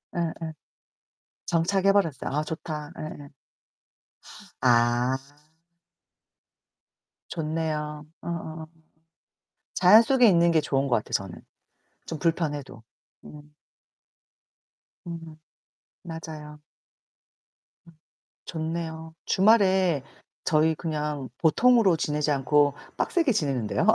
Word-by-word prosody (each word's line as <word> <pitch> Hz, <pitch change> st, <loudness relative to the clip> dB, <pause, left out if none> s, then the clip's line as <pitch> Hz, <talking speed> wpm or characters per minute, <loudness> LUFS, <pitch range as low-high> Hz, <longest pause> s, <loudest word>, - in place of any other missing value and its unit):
예예. 165 Hz, -1 st, -3 dB, 0.9 s
정착해버렸어요. 185 Hz, -3 st, +1 dB
아 150 Hz, +2 st, 0 dB
좋다. 155 Hz, -1 st, -6 dB
예예. 145 Hz, -2 st, -8 dB, 1.3 s
아. 120 Hz, +1 st, +3 dB, 2.1 s
좋네요. 155 Hz, -2 st, -3 dB, 0.2 s
어어어. 160 Hz, -2 st, -6 dB, 1.1 s
자연 195 Hz, +5 st, +7 dB
속에 250 Hz, 0 st, +4 dB
있는 170 Hz, -3 st, +4 dB
게 160 Hz, -, +3 dB
좋은 135 Hz, -1 st, 0 dB
거 125 Hz, -, +2 dB
같아요 110 Hz, -, -3 dB
저는, 95 Hz, -3 st, -3 dB, 0.7 s
좀 160 Hz, -, -5 dB
불편해도. 145 Hz, -6 st, -2 dB, 0.4 s
음. 150 Hz, 0 st, -13 dB, 1.5 s
음 165 Hz, -2 st, -8 dB, 0.7 s
맞아요. 155 Hz, -3 st, -8 dB, 1.2 s
음 170 Hz, -, -17 dB, 0.5 s
좋네요. 160 Hz, 0 st, -5 dB
주말에 190 Hz, -, +3 dB, 0.4 s
저희 160 Hz, -1 st, +3 dB
그냥 150 Hz, -4 st, -3 dB
보통으로 210 Hz, +3 st, +4 dB
지내지 150 Hz, -1 st, -1 dB
않고 145 Hz, +1 st, +3 dB, 0.2 s
빡세게 330 Hz, -8 st, +1 dB
지내는데요. 135 Hz, -, -1 dB
160 Hz, 185 characters per minute, -26 LUFS, 150-170 Hz, 2.1 s, 자연